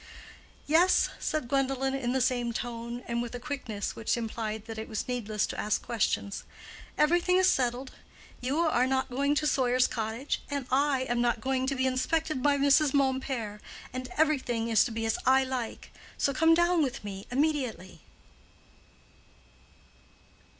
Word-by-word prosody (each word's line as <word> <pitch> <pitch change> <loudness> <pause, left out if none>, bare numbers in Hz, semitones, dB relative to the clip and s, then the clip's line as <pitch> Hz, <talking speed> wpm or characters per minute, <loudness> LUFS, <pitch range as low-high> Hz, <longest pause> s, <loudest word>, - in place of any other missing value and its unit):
"Yes," 335 +5 +4
said 310 -5 -2
Gwendolen, 270 0 0
in 260 -3 -1
the 260 0 +1
same 245 -2 0
tone, 235 +1 -5
and 235 0 -1
with 240 0 -5
a - - -5
quickness 245 -7 -4
which 225 - -1
implied 220 -2 -4
that 225 -1 -7
it 220 - -6
was 220 - -3
needless 220 -4 -1
to - - -6
ask 210 - 0
questions. 210 -3 -1 0.5
"Everything 350 +4 +3
is 375 0 +4
settled. 255 -3 0 0.5
You 270 +6 0
are 260 -7 +2
not 265 0 0
going 280 +3 +1
to 305 - 0
Sawyer's 255 -3 +3
Cottage, 225 +4 -3
I 280 0 +1
am 240 0 0
not 240 -1 +1
going 260 +2 -1
to 275 - 0
be 260 0 0
inspected 265 +3 0
by 285 +1 +3
Mrs. 280 +1 +4
Mompert, 260 -6 -1 0.3
and 255 0 -4
everything 260 -7 +1
is 225 -3 +5
to - - -4
be 225 0 -3
as 225 - 0
I 265 +1 +5
like. 255 -3 -5 0.3
So 280 - +1
come 325 +4 +5
down 345 0 +3
with 270 -5 -2
me 195 -1 -7
immediately." 255 - -1
255 Hz, 155 wpm, -29 LUFS, 235-280 Hz, 0.5 s, is